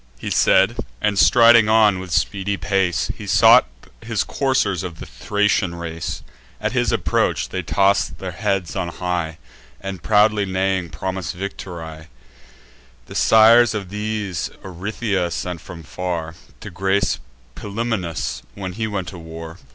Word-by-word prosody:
He -, -, -6 dB
said, -, -, +4 dB, 0.2 s
and 100 Hz, +3 st, 0 dB
striding 115 Hz, -3 st, +6 dB
on, 110 Hz, -4 st, +4 dB
with 95 Hz, -1 st, -8 dB
speedy 100 Hz, +5 st, 0 dB
pace, 95 Hz, -4 st, 0 dB
He -, -, -9 dB
sought -, -, +6 dB, 0.3 s
his -, -, -1 dB
coursers 110 Hz, -9 st, 0 dB
of 85 Hz, -3 st, -7 dB
the -, -, -7 dB
Thracian 95 Hz, +6 st, 0 dB
race. 80 Hz, -3 st, -5 dB, 0.4 s
At 105 Hz, 0 st, -1 dB
his 120 Hz, -4 st, +1 dB
approach -, -, 0 dB
they 95 Hz, -, -3 dB
toss 100 Hz, +4 st, +2 dB
their 95 Hz, -1 st, -7 dB
heads 95 Hz, -2 st, -2 dB
on 95 Hz, -3 st, -2 dB
high, 85 Hz, -2 st, -3 dB, 0.4 s
And, 95 Hz, -1 st, -6 dB
proudly 105 Hz, 0 st, +3 dB
neighing, 95 Hz, -1 st, -1 dB
promise 95 Hz, -1 st, -4 dB
victory. 85 Hz, -4 st, -7 dB, 1.0 s
The -, -, -11 dB
sires 115 Hz, +1 st, +6 dB
of 100 Hz, -3 st, -4 dB
these 105 Hz, -3 st, -3 dB
Orythia 95 Hz, 0 st, -2 dB
sent 90 Hz, 0 st, -4 dB
from 85 Hz, -3 st, -10 dB
far, 85 Hz, +3 st, -4 dB, 0.3 s
To 105 Hz, -, -8 dB
grace 95 Hz, +2 st, 0 dB, 0.3 s
Pilumnus, 100 Hz, -, -3 dB
when 95 Hz, -2 st, -5 dB
he 110 Hz, +2 st, -2 dB
went 100 Hz, -4 st, -3 dB
to 90 Hz, -, -10 dB
war. 80 Hz, +1 st, -9 dB
95 Hz, 140 wpm, -21 LUFS, 85-105 Hz, 1.0 s, striding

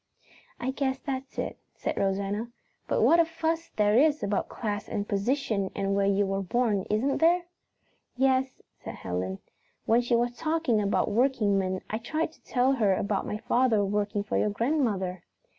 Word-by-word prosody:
"I 260 Hz, -, -1 dB
guess 265 Hz, -1 st, -1 dB
that's 270 Hz, -1 st, -5 dB
it," -, -, -3 dB, 0.2 s
said -, -, -3 dB
Rosanna. 200 Hz, +3 st, -1 dB, 0.4 s
"But -, -, +1 dB
what 335 Hz, -, +6 dB
a -, -, +7 dB
fuss 325 Hz, 0 st, -2 dB
there 210 Hz, 0 st, +3 dB
is 300 Hz, +1 st, +3 dB
about 200 Hz, 0 st, -1 dB
class 205 Hz, -3 st, -4 dB
and 205 Hz, 0 st, -2 dB
position 205 Hz, -1 st, 0 dB
and 195 Hz, 0 st, 0 dB
where 200 Hz, 0 st, +2 dB
you 200 Hz, 0 st, +2 dB
were 195 Hz, 0 st, -1 dB
born, 205 Hz, 0 st, 0 dB
isn't 235 Hz, +7 st, +1 dB
there?" 345 Hz, +2 st, +4 dB, 0.7 s
"Yes," 265 Hz, 0 st, +1 dB, 0.2 s
said -, -, -6 dB
Helen. 95 Hz, +1 st, -3 dB, 0.5 s
"When 230 Hz, +2 st, +4 dB
she 240 Hz, 0 st, +1 dB
was 240 Hz, +1 st, 0 dB
talking 310 Hz, -9 st, +1 dB
about 200 Hz, 0 st, +1 dB
workingmen 205 Hz, -6 st, +1 dB
I 220 Hz, -, -3 dB
tried 310 Hz, +7 st, -2 dB
to -, -, -24 dB
tell 255 Hz, +1 st, +2 dB
her 215 Hz, -8 st, +2 dB
about 200 Hz, 0 st, -1 dB
my 210 Hz, -, -2 dB
father 225 Hz, -2 st, +2 dB
working 205 Hz, 0 st, -1 dB
for 205 Hz, -, -2 dB
your 210 Hz, -, +2 dB
grandmother." 205 Hz, -, 0 dB
220 Hz, 170 wpm, -28 LUFS, 200-265 Hz, 0.7 s, a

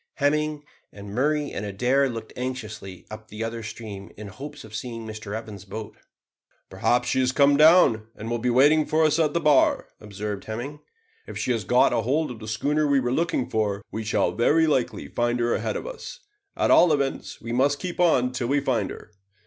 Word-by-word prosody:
Hemming 150 Hz, +1 st, 0 dB, 0.3 s
and 100 Hz, 0 st, -10 dB
Murray 145 Hz, +4 st, 0 dB
and 100 Hz, -, -4 dB
Adair 125 Hz, +7 st, +1 dB
looked 115 Hz, -2 st, -7 dB
anxiously 110 Hz, -7 st, -6 dB
up 110 Hz, 0 st, -9 dB
the 105 Hz, +1 st, -6 dB
other 115 Hz, 0 st, -4 dB
stream 110 Hz, -3 st, -8 dB
in 105 Hz, -, -8 dB
the 100 Hz, -, -10 dB
hopes 145 Hz, +5 st, -9 dB
of 110 Hz, -1 st, -13 dB
seeing 115 Hz, +1 st, -5 dB
Mr 110 Hz, -1 st, -6 dB
Evans' 105 Hz, -4 st, -9 dB
boat. 105 Hz, +2 st, -8 dB, 0.8 s
"Perhaps 125 Hz, 0 st, +1 dB
she -, -, +1 dB
has 130 Hz, -1 st, +2 dB
come 140 Hz, +1 st, +4 dB
down, 150 Hz, -8 st, +5 dB
and 110 Hz, -, -8 dB
will 120 Hz, 0 st, -1 dB
be 125 Hz, +2 st, 0 dB
waiting 145 Hz, +5 st, +4 dB
for 160 Hz, +1 st, +2 dB
us 155 Hz, +1 st, +2 dB
at 155 Hz, -1 st, +1 dB
the -, -, +3 dB
bar," 150 Hz, -4 st, +3 dB
observed 105 Hz, -1 st, -6 dB
Hemming. 125 Hz, +7 st, -5 dB, 0.5 s
"If -, -, -7 dB
she -, -, -1 dB
has 115 Hz, -5 st, -1 dB
got 125 Hz, +6 st, +4 dB
hold 135 Hz, +6 st, 0 dB
of 115 Hz, -, -9 dB
the 110 Hz, -, -9 dB
schooner 145 Hz, +8 st, 0 dB
we 140 Hz, -1 st, +3 dB
were 125 Hz, -1 st, -1 dB
looking 165 Hz, -4 st, 0 dB
for, 105 Hz, -2 st, -1 dB
we 110 Hz, -, -4 dB
shall 110 Hz, -, +1 dB
very 155 Hz, +8 st, +3 dB
likely 140 Hz, -6 st, 0 dB
find 120 Hz, 0 st, -1 dB
her 120 Hz, 0 st, +1 dB
ahead -, -, -2 dB
of -, -, -7 dB
us; -, -, -8 dB, 0.4 s
at -, -, +2 dB
all 175 Hz, -, +6 dB
events 140 Hz, -2 st, -2 dB
we 115 Hz, -, -7 dB
must 140 Hz, +4 st, +2 dB
keep 180 Hz, +3 st, -6 dB
on 130 Hz, -8 st, +3 dB
till 125 Hz, -2 st, -3 dB
we 140 Hz, +3 st, +2 dB
find 130 Hz, -4 st, 0 dB
her." -, -, -10 dB
125 Hz, 205 wpm, -25 LUFS, 110-145 Hz, 0.8 s, all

